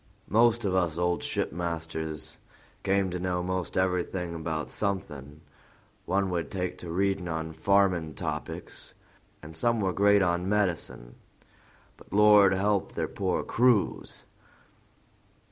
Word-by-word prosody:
Most 115 +1 +4
of 95 - 0
us 85 -4 +1
old 90 0 0
shipmasters 80 -2 -3 0.4
came 95 -1 +1
to 90 - -3
know 90 -1 -1
'most 95 -1 -3
everything 90 -1 -1
about 80 -1 -4
something; 75 -8 -3 0.7
one 95 +1 +1
would 85 -5 -2
take 90 -2 -4
to 85 - -8
readin' 95 +1 0
on 80 -1 -3
farming 90 -2 +2
topics, - - -6 0.5
and 80 +1 -10
some 115 +7 +1
were 95 -3 0
great 100 +1 +4
on 90 +1 0
medicine, 90 -12 -1 0.8
but - - -18
Lord 105 -1 +6
help 100 0 0
their 80 -1 -2
poor 95 +1 -1
crews! 120 -4 +1
90 Hz, 125 wpm, -28 LUFS, 85-100 Hz, 0.8 s, Lord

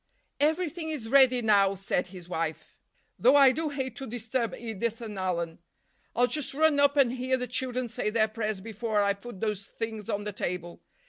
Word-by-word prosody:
——"Everything 320 +2 0
is 285 -8 -4
ready 255 -1 +5
now," 200 -2 +4
said 190 -1 -1
his 180 -2 -11
wife. 165 -3 -4 0.4
"Though 255 +4 +6
I 275 -2 +8
do 310 +4 -2
hate 265 -4 -4
to 270 - -6
disturb 235 +1 -2
Edith 230 0 -3
and 215 -4 -6
Alan. 170 -3 -2 0.6
I'll 245 - +4
just 270 +2 -3
run 310 -1 +4
up 285 0 +4
and 265 -4 +5
hear 255 +1 0
the 250 - -3
children 250 0 -2
say 220 -2 -2
their 220 0 +2
prayers 215 -2 -3
before 220 0 -1
I 200 0 +2
put 200 0 -11
those 210 -3 -1
things 220 -2 -5
on 205 0 -1
the 210 0 -4
table. 175 -2 -4
230 Hz, 190 wpm, -28 LUFS, 200-260 Hz, 0.6 s, I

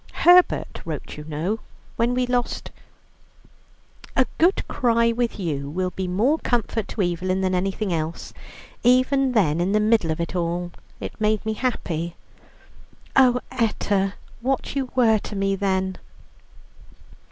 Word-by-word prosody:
Herbert 355 +1 +5
wrote - - -6
you 150 - -9
know, 160 +8 -2 0.4
when 235 +2 +1
we 250 0 +1
lost 245 -1 -2 1.4
'A 260 - +4
good 355 +5 +3
cry 235 -2 +2
with 235 -1 -1
you 145 -6 -2
will 185 +4 -2
be 190 0 -4
more 235 - +2
comfort 230 -3 -1
to 205 - -2
Evelyn 185 +2 -1
than 185 -1 0
anything 195 +1 -1
else.' 160 0 -4 0.5
Even 255 +2 +3
then, 170 -8 +2
in 185 +3 +1
the 215 - +4
middle 215 -5 +3
of 160 +1 -1
it 170 +2 -3
all, 175 0 -2 0.3
it - - -7
made 215 0 +1
me 220 - 0
happy." 175 -9 -2 1.0
"Oh, 250 -2 +5
Etta, 205 -5 0 0.3
what 265 +2 -1
you 270 -2 -1
were 225 -4 +4
to 205 - -8
me 195 0 +1
then!" 190 -1 -1
210 Hz, 140 wpm, -23 LUFS, 180-245 Hz, 1.4 s, Herbert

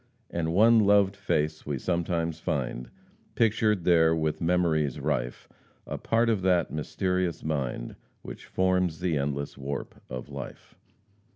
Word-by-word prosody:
And 80 -1 -1
one 110 +6 +6
loved 100 -1 +4
face 75 -2 -1
we 70 -2 -3
sometimes 85 0 -1
find 60 -5 -3 0.5
Pictured 110 -4 +2
there 80 -2 +4
with 80 -1 -1
memories 80 -5 +1
rife 65 -4 -2 0.4
A - - -5
part 115 +1 +1
of 110 -4 +1
that 90 -2 +2
mysterious 90 +2 -1
mind 70 -6 -3 0.3
Which - - -9
forms 90 -3 +1
the 90 -3 0
endless 70 0 -3
warp 70 +1 -5
of 65 -1 -6
life." - - -9
80 Hz, 130 wpm, -27 LUFS, 75-95 Hz, 0.5 s, one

